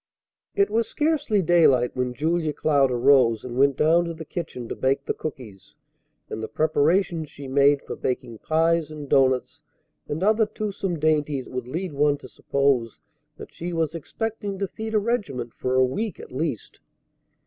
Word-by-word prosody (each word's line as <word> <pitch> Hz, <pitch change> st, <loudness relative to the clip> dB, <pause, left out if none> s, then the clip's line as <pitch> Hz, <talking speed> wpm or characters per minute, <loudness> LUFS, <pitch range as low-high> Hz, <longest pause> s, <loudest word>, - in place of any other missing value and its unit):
It 400 Hz, -1 st, +2 dB
was 230 Hz, 0 st, +1 dB
scarcely 295 Hz, -10 st, +1 dB
daylight 155 Hz, -8 st, +4 dB
when 125 Hz, -1 st, -2 dB
Julia 160 Hz, +2 st, 0 dB
Cloud 145 Hz, -2 st, +2 dB
arose 125 Hz, -3 st, +3 dB
and 120 Hz, -1 st, -6 dB
went 135 Hz, +1 st, +3 dB
down 165 Hz, +3 st, +4 dB
to 170 Hz, -1 st, -5 dB
the 160 Hz, 0 st, -8 dB
kitchen 150 Hz, -8 st, -6 dB
to -, -, -5 dB
bake 135 Hz, +1 st, 0 dB
the -, -, -1 dB
cookies; 120 Hz, -10 st, -8 dB, 0.5 s
and 110 Hz, -, -6 dB
the 110 Hz, -, -3 dB
preparations 160 Hz, -, +1 dB
she 140 Hz, -1 st, -10 dB
made 140 Hz, +1 st, +3 dB
for -, -, -6 dB
baking 125 Hz, -3 st, -3 dB
pies 165 Hz, 0 st, +1 dB
and 150 Hz, -2 st, -8 dB
doughnuts 130 Hz, -2 st, +2 dB, 0.5 s
and 155 Hz, +5 st, -3 dB
other 215 Hz, +1 st, +3 dB
toothsome 200 Hz, -4 st, -3 dB
dainties 150 Hz, -3 st, 0 dB
would 125 Hz, -1 st, -5 dB
lead 170 Hz, +5 st, -4 dB
one 145 Hz, 0 st, +2 dB
to 130 Hz, -, -12 dB
suppose 130 Hz, -3 st, 0 dB, 0.4 s
that -, -, -11 dB
she 175 Hz, +1 st, -5 dB
was 165 Hz, -2 st, 0 dB
expecting 205 Hz, +4 st, -4 dB
to 195 Hz, 0 st, -2 dB
feed 220 Hz, +3 st, -5 dB
a -, -, +5 dB
regiment 175 Hz, -, -2 dB
for 130 Hz, 0 st, -2 dB
a 130 Hz, 0 st, +5 dB
week 205 Hz, -, -3 dB
at -, -, -11 dB
least. 135 Hz, -3 st, -4 dB
150 Hz, 170 wpm, -24 LUFS, 130-175 Hz, 0.5 s, a